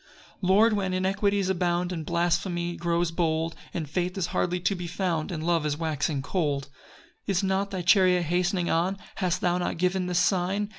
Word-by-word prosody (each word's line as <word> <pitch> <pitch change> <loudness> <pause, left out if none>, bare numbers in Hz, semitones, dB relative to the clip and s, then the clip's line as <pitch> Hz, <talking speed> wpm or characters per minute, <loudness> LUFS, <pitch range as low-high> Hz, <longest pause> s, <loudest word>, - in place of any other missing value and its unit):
PAUSE. - - -25
5 185 - -1
Lord, 215 +4 +5
when 190 -3 -1
iniquities 195 +1 +1
abound, 175 -1 0
And 165 -3 -4
blasphemy 175 +1 0
grows 170 0 0
bold, 165 -1 0 0.2
When 165 - -3
faith 180 +5 -2
is 190 - 0
hardly 180 0 0
to 185 +3 +1
be 175 -2 -5
found, 175 -3 -2
And 160 -2 -4
love 170 -2 +2
is 150 -1 -1
waxing 150 -3 -1
cold, 145 -4 -1
6 140 +1 -17 0.6
Is 180 - +1
not 195 +1 0
thy 190 -3 -4
chariot 180 -1 +4
hastening 175 +2 0
on? 180 +4 +1 0.2
Hast 185 -2 0
thou 180 0 +1
not 175 - -2
given 180 +1 0
this 180 -1 0
sign? 185 +3 +1
175 Hz, 195 wpm, -27 LUFS, 170-190 Hz, 0.6 s, Lord